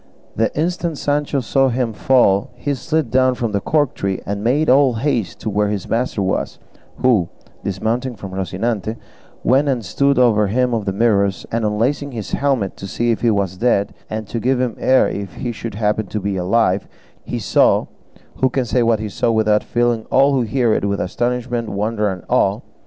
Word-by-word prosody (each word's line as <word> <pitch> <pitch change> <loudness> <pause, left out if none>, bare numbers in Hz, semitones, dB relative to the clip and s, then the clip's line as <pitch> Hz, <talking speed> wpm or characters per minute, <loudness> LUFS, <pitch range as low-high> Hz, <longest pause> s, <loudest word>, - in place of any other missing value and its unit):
The 115 +1 +1
instant 170 -1 -1
Sancho 145 -1 0
saw 135 +3 +2
him 120 -2 -1
fall 105 -5 +3
he 145 - -2
slid 150 -2 -1
down 130 0 +3
from 115 -3 -2
the 100 -1 -1
cork 145 0 +1
tree, 95 -1 -2
and 100 +1 -3
made 140 +7 +2
all 130 -1 +4
haste 115 -4 -1
to 110 - -2
where 105 +1 +1
his 100 -2 -3
master 115 -3 -1
was, 95 - -2 0.5
who, 110 -9 +3 0.3
dismounting 115 +6 -2
from 95 -2 -8
Rocinante, 100 +4 -2 0.5
went 135 +4 +3
and 125 -5 -1
stood 140 +7 +1
over 110 -4 +4
him 125 +4 +1
of 110 -3 -1
the 95 - 0
Mirrors, 100 -2 +1
and 115 0 -1
unlacing 125 +7 0
his 105 -7 -6
helmet 135 -9 0
to 100 - -7
see 120 +5 0
if 115 - -2
he 120 - +3
was 100 -4 0
dead, 100 -3 +1 0.2
and 110 0 -4
to 115 - -4
give 125 +3 +1
him 125 -3 -1
air 130 0 +4
if 100 -1 -5
he 120 - -3
should 115 -1 -6
happen 105 0 0
to 105 - -3
be 100 0 -2
alive, 95 +1 +1 0.4
he - - -4
saw - - +3 0.5
who 130 - +2
can 130 0 -1
say 120 +1 +1
what 115 -2 +2
he 110 - -3
saw, 105 - -1
without 110 -1 +2
filling 120 -2 0
all 140 +1 +4
who 135 - +2
hear 120 -1 +1
it - - 0
with 100 0 -1
astonishment, 120 +3 -2
wonder, 105 +1 -1
and 90 -2 -6
awe? - - +2
115 Hz, 195 wpm, -19 LUFS, 100-130 Hz, 0.5 s, all